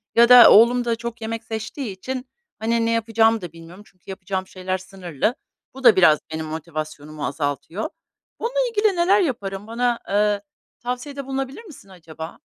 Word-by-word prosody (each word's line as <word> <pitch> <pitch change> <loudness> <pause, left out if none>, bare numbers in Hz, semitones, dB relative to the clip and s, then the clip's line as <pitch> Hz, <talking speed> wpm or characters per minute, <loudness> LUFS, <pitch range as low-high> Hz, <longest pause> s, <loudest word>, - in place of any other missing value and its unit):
ya 235 +1 +6
da 250 -1 +10
oğlum 240 +3 +6
da 235 -1 +1
çok 235 0 -7
yemek 225 +1 -4
seçtiği 220 +2 -5
için, 255 +5 -5 0.3
hani, 230 +1 0
ne 230 - +1
yapacağımı 225 -1 +2
da 175 -3 -7
bilmiyorum. 170 +4 -13
Çünkü 180 -2 -28
yapacağım 190 -1 -4
şeyler 185 0 -4
sınırlı. 190 - -3 0.4
Bu 265 - -11
da 235 -3 +7
biraz 160 -5 +5
benim 160 0 -4
motivasyonumu 155 -1 -6
azaltıyor. 145 +7 -3 0.5
Bununla 485 +2 -2
ilgili 420 -3 +2
neler 365 +4 +3
yaparım? 205 - -3
Bana, 240 +1 0
eee, 205 0 +1 0.4
tavsiyede 265 +3 -5
bulunabilir 270 - -4
misin 300 - -14
acaba? 165 -3 -10
220 Hz, 160 wpm, -22 LUFS, 180-245 Hz, 0.5 s, da